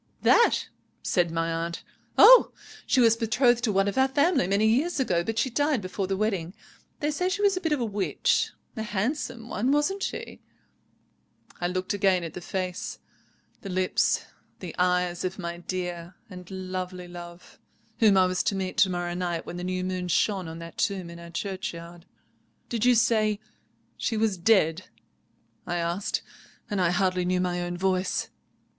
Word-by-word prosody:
"'That?' 470 - +4 0.4
said 175 -2 +1
my 165 0 -1
aunt. 165 +1 -4 0.3
'Oh! - - +9 0.4
she 265 - +3
was 230 -2 +6
betrothed 235 +1 +2
to 225 - +2
one 195 0 +2
of 200 +6 0
our 265 - +5
family 285 - +2
many 200 +3 +2
years 275 +10 +2
ago, 175 -10 +1
but 225 +4 -3
she 260 - +1
died 290 +1 +1
before 190 0 -4
the 195 0 -1
wedding. 195 -4 -1 0.5
They 295 +1 +1
say 360 +5 0
she 405 +2 -2
was 400 -1 +4
a 370 - -3
bit 325 -4 -1
of 300 - +2
a 240 - 0
witch. 205 -2 0 0.3
A 220 - -4
handsome 230 +3 -3
one, 240 +3 0
wasn't 295 +8 +1
she?' - - -5 1.2
"I 175 - 0
looked 185 +2 -2
again 190 -3 +2
at 165 -2 -6
the 180 - -7
face, 185 0 -4 0.6
the 195 - -7
lips, 185 0 +1 0.3
the - - -7
eyes 180 -1 +1
of 185 0 -3
my 170 -2 -5
dear 175 -1 -5 0.2
and 180 -1 -10
lovely 185 -1 -5
love, 175 0 -11 0.4
whom 210 -5 +5
I 185 - +6
was 185 0 0
to 200 - +1
meet 190 -1 -3
to 190 - +5
morrow 175 -1 -2
night 175 -2 -2
when 175 - -7
the 175 - -5
new 185 0 -2
moon 185 -1 -3
shone 185 +1 +1
on 160 0 -7
that 165 0 -10
tomb 195 -5 -1
in 170 - -10
our 170 0 -10
churchyard. 175 -2 -6 0.6
"'Did 230 -1 -1
you 250 0 +6
say 215 -2 +2 0.6
she 225 - -1
was 215 -2 +1
dead?' 180 -2 +2 0.8
I 175 - -1
asked, 175 +3 -1 0.5
and 200 -2 0
I 175 - +3
hardly 185 0 +1
knew 180 +1 +1
my 180 -1 -1
own 175 0 -3
voice. 185 0 0
185 Hz, 180 wpm, -26 LUFS, 175-225 Hz, 1.2 s, Oh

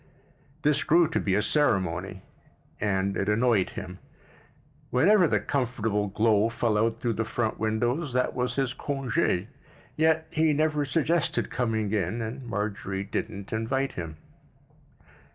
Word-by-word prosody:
This 150 0 +3
grew 170 +1 +4
to - - 0
be 95 -2 0
a 105 - +2
ceremony—and 95 - -2
it 100 - -1
annoyed 110 -3 +2
him. 90 +1 -7 0.9
Whenever 180 +8 +5
the - - +2
comfortable 115 -6 -1
glow 110 +2 +2
fell 115 -1 0
out 115 +1 +1
through 120 -1 0
the 115 - -1
front 110 0 -2
windows, 120 +7 0
that 125 0 +1
was 125 -1 -2
his 135 -2 0
congķ; 130 -10 -1 0.5
yet 160 0 +2
he 155 -1 +2
never 150 0 +1
suggested 165 +3 0
coming 110 -4 -1
in 105 +2 -1
and 115 +4 -5
Marjorie 100 -2 -3
didn't 100 0 -5
invite 130 +5 -1
him. 80 -3 -6
115 Hz, 135 wpm, -27 LUFS, 105-135 Hz, 0.9 s, Whenever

